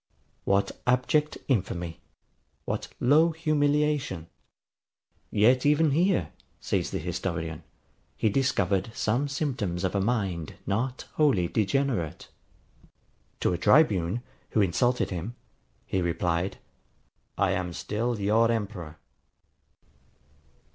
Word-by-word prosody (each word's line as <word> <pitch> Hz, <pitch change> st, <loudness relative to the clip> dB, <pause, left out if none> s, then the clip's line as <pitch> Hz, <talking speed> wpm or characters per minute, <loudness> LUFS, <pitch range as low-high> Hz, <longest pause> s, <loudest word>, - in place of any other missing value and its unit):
What 100 Hz, 0 st, +2 dB, 0.2 s
abject 130 Hz, +5 st, +2 dB
infamy! 90 Hz, -, -1 dB, 0.7 s
What -, -, -3 dB
low 150 Hz, +6 st, +5 dB
humiliation! 150 Hz, -, 0 dB, 1.0 s
Yet 125 Hz, +5 st, +4 dB
even 150 Hz, +1 st, +4 dB
here, 150 Hz, -, +2 dB, 0.3 s
says -, -, -1 dB
the -, -, -3 dB
historian, 80 Hz, -3 st, -3 dB, 0.6 s
he -, -, +1 dB
discovered 100 Hz, -5 st, +1 dB
some 120 Hz, +7 st, 0 dB
symptoms 125 Hz, -, -2 dB
of 95 Hz, -, 0 dB
a 100 Hz, -, +1 dB
mind 95 Hz, -7 st, -1 dB
not 120 Hz, +6 st, -2 dB
wholly 135 Hz, -, +3 dB
degenerate. 110 Hz, -, -1 dB, 1.1 s
To -, -, +2 dB
a 85 Hz, -, -2 dB
tribune, 105 Hz, -, +3 dB, 0.3 s
who 110 Hz, -, +2 dB
insulted 100 Hz, +7 st, +1 dB
him, 95 Hz, +7 st, -4 dB, 0.5 s
he 95 Hz, -, -1 dB
replied, 85 Hz, +1 st, -1 dB, 0.8 s
I -, -, +2 dB
AM 90 Hz, -1 st, -1 dB
STILL 115 Hz, +6 st, -2 dB
YOUR 110 Hz, +3 st, +3 dB
EMPEROR. 100 Hz, -8 st, -4 dB
110 Hz, 100 wpm, -27 LUFS, 90-135 Hz, 1.1 s, low